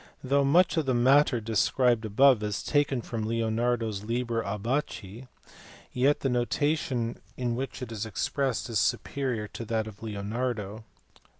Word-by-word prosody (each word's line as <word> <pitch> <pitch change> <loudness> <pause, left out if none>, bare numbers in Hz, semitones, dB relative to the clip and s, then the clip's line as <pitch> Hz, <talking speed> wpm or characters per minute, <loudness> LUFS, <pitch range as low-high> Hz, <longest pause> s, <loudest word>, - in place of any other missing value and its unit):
Though 140 +2 +2
much 170 +6 +4
of 155 -4 0
the 130 - +2
matter 130 +1 +4
described 115 +2 +2
above 125 +3 +5
is 105 -2 -2
taken 140 -4 +1
from 110 -2 -4
Leonardo 115 +1 0
s 100 -2 -5
Liber 115 +1 -1
Abaci, 115 +1 -3 0.6
yet 135 +4 +2
the - - 0
notation 125 0 0 0.2
in 120 -2 -1
which 130 +1 -4
it 120 - -7
is 110 -2 -4
expressed 125 +5 -1
is 115 -5 0
superior 125 -3 -1
to - - -7
that 110 0 -1
of 105 -2 -11
Leonardo. 110 0 -4
120 Hz, 145 wpm, -28 LUFS, 110-130 Hz, 0.6 s, above